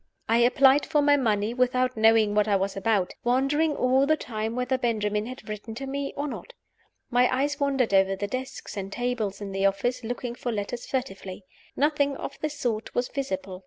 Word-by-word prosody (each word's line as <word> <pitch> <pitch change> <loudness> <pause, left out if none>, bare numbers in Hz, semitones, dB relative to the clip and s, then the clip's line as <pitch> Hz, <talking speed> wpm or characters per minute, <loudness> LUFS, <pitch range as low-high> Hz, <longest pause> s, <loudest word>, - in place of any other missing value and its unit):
I 230 +1 +3
applied 265 +3 +5
for 295 -1 +2
my 290 0 +5
money 220 -4 +1
without 255 0 +1
knowing 220 -1 +4
what 210 0 +2
I 205 - +3
was 195 0 -1
about; 195 -2 0
wondering 275 +5 +2
all 260 +2 +3
the 310 +1 +3
time 220 -2 -4
whether 250 +1 0
Benjamin 215 -4 -1
had 255 +2 -9
written 215 +1 -6
to 270 +4 -5
me 275 +1 -3
or 290 +1 -1
not. - - -7 0.6
My 245 +1 +4
eyes 280 +3 0
wandered 270 -6 +1
over 195 0 +4
the 205 - -3
desks 255 +1 -6
and 195 -1 -5
tables 225 -4 -2
in 200 -1 -5
the 195 0 +2
office, 245 +6 -1
looking 245 +1 -4
for 245 0 -4
letters 220 +3 -4
furtively. 200 -7 -4 0.3
Nothing 285 -1 +1
of 280 - -7
the 305 - -1
sort 240 -7 -3
was 245 0 0
visible. 190 -9 -4
245 Hz, 195 wpm, -26 LUFS, 210-270 Hz, 0.6 s, applied